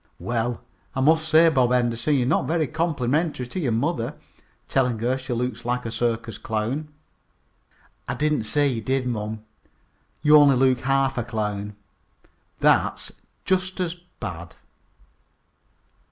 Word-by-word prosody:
"Well, 120 0 -2 0.3
I - - -1
must 160 +3 +3
say, 160 +2 +6
Bob 130 -5 +2
Henderson, 120 +3 +1
you're 125 -3 +2
not 130 - +1
very 160 -1 +1
complimentary 150 -1 -1
to 125 +10 -5
your 135 -9 0
mother, 115 +1 -1 0.5
telling 125 -3 +1
her 120 +4 0
she 130 -1 -7
looks 120 -1 -2
like 125 0 -2
a 115 - -3
circus 115 -1 -2
clown." 115 +8 -2 1.2
"I - - -2
didn't 150 -6 0
say 145 +5 +2
you 120 -5 -1
did, 130 +3 -1
mom. 110 -2 -3 0.8
You 150 0 +7
only 145 -2 +6
look 130 0 +3
like - - -12
half 135 -2 +2
a - - -1
clown." 105 -2 -3 0.9
"That's - - +2 0.3
just 185 0 0
as 175 -2 -1 0.3
bad." 85 -3 -7
125 Hz, 140 wpm, -24 LUFS, 115-150 Hz, 1.2 s, You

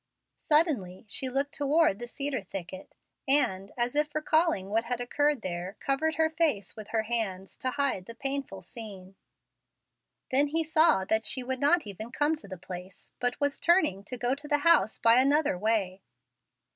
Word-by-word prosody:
Suddenly 275 - +1
she 260 +5 +1
looked 275 +2 -1
toward 290 -6 +2
the 240 - -6
cedar 275 -1 -3
thicket, 190 -1 -8 0.3
and, 200 -9 +1
as 240 +2 -1
if 300 0 0
recalling 310 - +1
what 225 +2 +1
had 245 0 -2
occurred 290 +1 0
there, 180 +2 -4
covered 310 +4 0
her 320 +1 +3
face 315 - -1
with 215 -2 -9
her 220 0 -1
hands, 205 -5 -2
to 255 - -2
hide 265 -9 -1
the 230 - -9
painful 275 +2 -4
scene. 195 -5 -9 1.2
Then 280 +3 +4
he 325 +3 0
saw 315 - +3
that 220 +2 +1
she 255 +3 +1
would 260 +1 -3
not 300 +3 +3
even 215 +3 -7
come 295 +4 +1
to 250 - -11
the 190 -1 -7
place, 180 +2 -9
but 245 +1 -1
was 285 -1 0
turning 320 - +2
to 250 - -5
go 245 +1 0
to 290 +2 -5
the 295 -1 +3
house 220 - +5
by 230 +2 +5
another 290 -1 +2
way. 195 -1 -1
245 Hz, 175 wpm, -28 LUFS, 200-290 Hz, 1.2 s, house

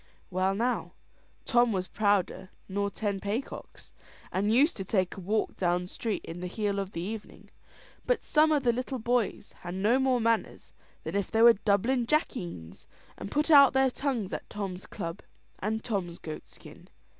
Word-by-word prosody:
Well, 185 +1 +1
now, 240 +4 -1 0.5
Tom 240 -1 +4
was 185 -2 -1
prouder 195 -3 0 0.2
nor 200 +1 -1
ten 200 -1 -2
paycocks, 210 +7 -5 0.4
and 205 +3 +1
used 280 +8 +4
to 195 - -3
take 185 -2 0
a - - -8
walk 210 +4 -1
down 180 -1 0
street 215 +3 -4
in 165 +1 -7
the 180 - -4
heel 200 +1 -1
of 195 0 -4
the 165 - -3
evening; 210 +4 -7 0.6
but - - +1
some 310 +1 +4
o' 305 - +4
the 250 -4 +2
little 255 +2 -3
boys 240 -1 -1
had 175 +1 -6
no 215 +7 +3
more 260 -2 +2
manners 230 0 -1 0.3
than - - -5
if 200 -2 0
they 225 0 +3
were 235 0 +9
Dublin 230 +4 +1
jackeens, 175 - -2 0.3
and - - -7
put 300 +5 +1
out 280 -4 +8
their 265 -1 +3
tongues 245 -8 -2
at - - -5
Tom's 195 -3 -5
club 165 0 -6 0.4
and 220 +2 -2
Tom's 185 -7 -3
goat 155 -1 -8
skin. - - -14
210 Hz, 175 wpm, -29 LUFS, 190-245 Hz, 0.6 s, were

